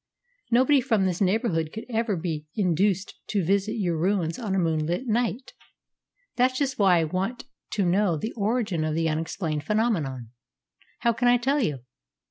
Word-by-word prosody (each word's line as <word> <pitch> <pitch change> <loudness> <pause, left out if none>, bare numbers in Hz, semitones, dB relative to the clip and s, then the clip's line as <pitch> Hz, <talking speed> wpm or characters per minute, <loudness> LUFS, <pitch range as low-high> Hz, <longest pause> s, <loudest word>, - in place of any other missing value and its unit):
Nobody 260 +4 +4
from 220 -6 +1
this 180 0 -1
neighbourhood 185 -5 +1
could 220 - -7
ever 225 -3 0
be 160 -3 -4
induced 190 0 0
to 200 -5 0
visit 200 +4 +1
your 185 -7 -1
ruins 175 -2 0
on 210 -5 -2
a - - +1
moonlit 165 +4 0
night." 240 +2 -1 0.8
"That's 255 +1 +2
just 270 -3 -1
why 190 -3 +5
I 165 - +2
want 190 +11 -3 0.3
to 200 -3 +1
know 180 -1 +2
the 220 +10 -4
origin 210 -6 0
of 155 0 -1
the 165 0 +1
unexplained 155 -1 -2
phenomenon." 160 - -1 0.7
"How 235 -1 +3
can 245 +2 0
I 245 0 +6
tell 270 +5 +1
you?" 145 - -1
195 Hz, 165 wpm, -26 LUFS, 165-230 Hz, 0.8 s, I